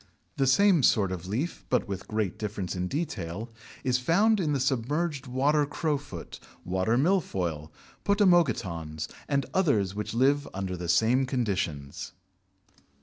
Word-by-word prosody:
The 135 - +2
same 185 +4 +5
sort 105 -6 +3
of 90 -1 -5
leaf, 110 - -3
but - - +1
with 95 -2 -5
great 105 -5 -2
difference 105 -4 -3
in 90 0 -2
detail, 110 - -4 0.3
is 125 -1 +2
found 200 - +3
in 160 -5 0
the 140 - +1
submerged 140 +3 -1
Water 140 +4 +2
Crowfoot, 145 - -4 0.3
Water 95 +6 +1
Milfoil, 95 - 0 0.3
Potamogetons, 115 - +2 0.2
and 140 -1 +1
others 115 - +2
which 105 +2 -4
live 140 +4 +3
under 95 -1 -3
the 85 -1 -5
same 115 +9 +3
conditions. 95 - -2
120 Hz, 135 wpm, -28 LUFS, 95-145 Hz, 0.3 s, same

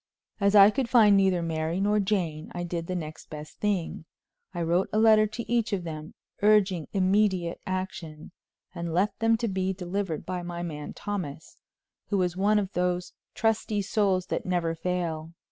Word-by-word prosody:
As 200 0 +3
I 200 +1 +9
could 245 +2 -2
find 220 -5 +6
neither 190 -3 +3
Mary 160 +1 -2
nor 210 +2 +2
Jane, 180 -7 -1
I 175 - -3
did 170 -1 -4
the 185 - -3
next 155 -3 -7
best 150 0 -9
thing: 190 -6 -1 0.5
I 175 -2 -3
wrote 175 +3 +1
a - - 0
letter 215 -1 +6
to 235 +3 -6
each 235 -2 0
of 190 -3 -1
them, 155 -1 -7 0.3
urging 200 -6 +3
immediate 190 -3 +1
action, 180 -5 -5 0.4
and 170 -2 -4
left 195 +4 +1
them 225 0 +3
to 230 +1 -2
be 190 -1 -1
delivered 185 -2 -3
by 180 -1 -3
my 175 0 -5
man 150 -3 -6
Thomas, 180 -8 -5 0.5
who 205 - 0
was 180 -2 0
one 205 +3 +3
of 200 -2 -1
those 180 0 -1 0.2
trusty 220 -2 0
souls 195 -3 +1
that - - -3
never 175 -2 0
fail. 165 -2 -3
185 Hz, 175 wpm, -27 LUFS, 170-205 Hz, 0.5 s, I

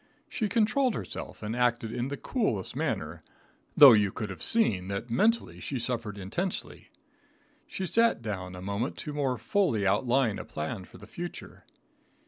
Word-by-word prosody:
She 215 -3 -2
controlled 245 +3 +2
herself - - -6
and 110 +2 -3
acted 120 -2 +1
in 120 +1 -2
the 140 +1 -4
coolest 170 - -2
manner, - - -2 0.6
though 140 -3 +11
you 105 -3 +3
could 105 -1 -5
have 95 - -9
seen 105 - +2
that 100 +4 -4
mentally 225 - +1
she 135 - -3
suffered 115 -4 -3
intensely. 140 - -4 0.8
She 190 - -4
sat 230 - +3
down 95 -4 -5
a 90 - -8
moment 100 +7 -2
to 150 - -5
more 135 -4 0
fully 115 - +1
outline 115 +2 +2
a - - -5
plan 80 +5 -5
for - - -15
the - - -12
future. 175 0 -8
120 Hz, 160 wpm, -28 LUFS, -, 0.8 s, though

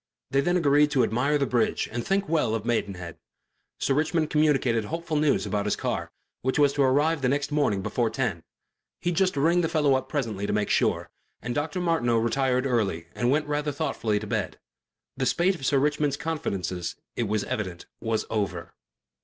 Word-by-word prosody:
They 135 - +3
then 175 +5 +2
agreed 145 -2 +4
to 130 -4 +2
admire 125 +7 +1
the 140 - +1
bridge 120 -4 +1
and 120 +1 -3
think 195 0 0
well 150 -9 +1
of 110 -1 -4
Maidenhead. 95 -8 -2 0.6
Sir 135 - +1
Richmond 155 +2 0
communicated 135 -7 +2
hopeful 165 +3 -3
news 150 -1 +2
about 105 -1 -1
his 105 - +1
car, - - -3 0.3
which 130 +1 0
was 145 -1 +4
to 145 - 0
arrive 145 +4 +3
the 125 - +2
next 140 +2 0
morning 125 -10 +1
before - - 0
ten - - -2 0.6
he'd 175 -1 0
just 185 -3 +2
ring 170 +5 +3
the 165 - 0
fellow 150 -4 +3
up 130 0 -1
presently 110 -9 -2
to - - -1
make 105 -1 0
sure - - +1 0.3
and 120 - -4
Dr. 150 +6 -2
Martineau 165 -10 +1
retired 125 +3 +1
early 100 -10 0
and 120 0 0
went 150 +3 +2
rather 150 0 -1
thoughtfully 115 -7 -1
to 110 - -6
bed. 100 - -2 0.6
The - - 0
spate 180 +3 +2
of 135 -8 -4
Sir 140 - +3
Richmond's 145 0 +1
confidences, 95 - -3 0.2
it 120 - -1
was 105 0 0
evident, 95 -5 -4
was 110 -1 -1
over. 95 -6 -2
135 Hz, 190 wpm, -26 LUFS, 110-150 Hz, 0.6 s, agreed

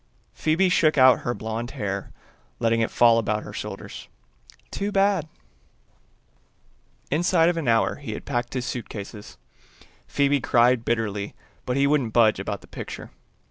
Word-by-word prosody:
Phoebe 160 +5 +2
shook 155 -4 +3
out 130 -1 +7
her 120 - -3
blonde 110 +2 -4
hair, 100 -1 -3 0.5
letting 115 0 +1
it 115 - +1
fall 115 -1 +5
about 105 -1 -1
her - - -9
shoulders. - - -7 0.6
"Too 200 +1 -3
bad." 195 -5 +2 1.8
Inside 165 +2 +3
of 175 - -1
an 160 -6 -3
hour 115 -1 +2
he 140 -7 -6
had - - -8
packed 120 +1 -3
his 125 -1 -2
suitcases. 105 -4 -7 0.7
Phoebe 140 -1 +1
cried 120 -1 +3
bitterly, 105 -4 -2 0.3
but 125 +1 0
wouldn't 140 -5 +2
budge 110 -4 +4
about 100 0 -4
the - - -17
picture. - - -8
120 Hz, 140 wpm, -24 LUFS, 110-150 Hz, 1.8 s, out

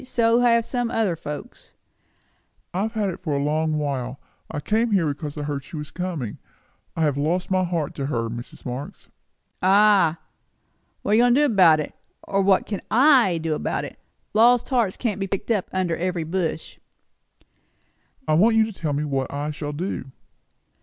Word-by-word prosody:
So 235 -2 +2
have 235 -2 +3
some 245 -2 -2
other 220 -7 0
folks." 150 -2 -8 1.0
"I 185 - -1
have 220 +2 -2
had 210 -3 0
it 180 - -6
for 155 -5 -2
a 140 - -1
long 155 +1 0
while. 135 -3 -3 0.3
I - - -4
came 220 +9 +1
here 180 -5 +3
because 145 +1 -5
I 150 - -3
heard 145 -2 -3
she 160 - -11
was 150 -1 -6
coming. 170 - -4 0.6
I 165 - +1
have 145 -3 +1
lost 170 +6 -1
my 185 0 +3
heart 170 -5 -2
to 135 -1 -3
her, 115 -5 -1
Mrs. 120 +2 -8
Marx." 130 +3 -7 0.5
"Ah! 195 -3 +5 0.9
What - - -1
are - - +4
you 225 - +5
going 245 0 +4
to 290 - +4
do - - +5
about 170 -6 +6
it? 150 - -4 0.3
or 195 0 0
what 190 -1 +3
can 205 - -4
I 250 - +5
do 160 -1 0
about - - -2
it? - - -11 0.3
Lost 240 +2 +4
hearts 235 -8 +1
can't 210 -5 -2
be 195 - -2
picked 195 +4 -3
up 205 -5 0
under 185 -3 0
every 175 -1 -2
bush." 165 -1 -3 1.5
"I - - +2
want 215 +8 +4
you 220 0 +5
to 220 - -7
tell 155 -6 -3
me 145 +2 -1
what 135 -3 -2
I 145 +2 -3
shall 145 0 -5
do." 165 -1 -4
175 Hz, 190 wpm, -23 LUFS, 150-215 Hz, 1.5 s, about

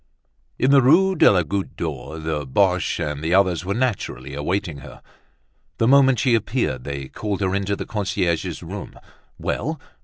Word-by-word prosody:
In 130 - +2
the 140 -1 +7
Rue 185 +9 +4
de - - +6
la 90 -3 +3
Goutte 95 +5 -3
d'Or 80 -1 -5
the 80 -2 -3
Boches 90 +6 +1
and 75 0 -5
the 85 +3 +2
others 95 -3 +2
were 100 +2 -2
naturally 115 - -2
awaiting 85 +2 -2
her. - - -12 0.8
The 115 - +2
moment 135 -1 +5
she 125 0 +2
appeared 110 - -1
they 70 -1 -5
called 105 +6 -4
her 95 -1 0
into 100 0 -1
the - - -6
concierge's 95 -5 -2
room. - - -8 0.4
Well! - - -3
95 Hz, 165 wpm, -22 LUFS, 80-115 Hz, 0.8 s, the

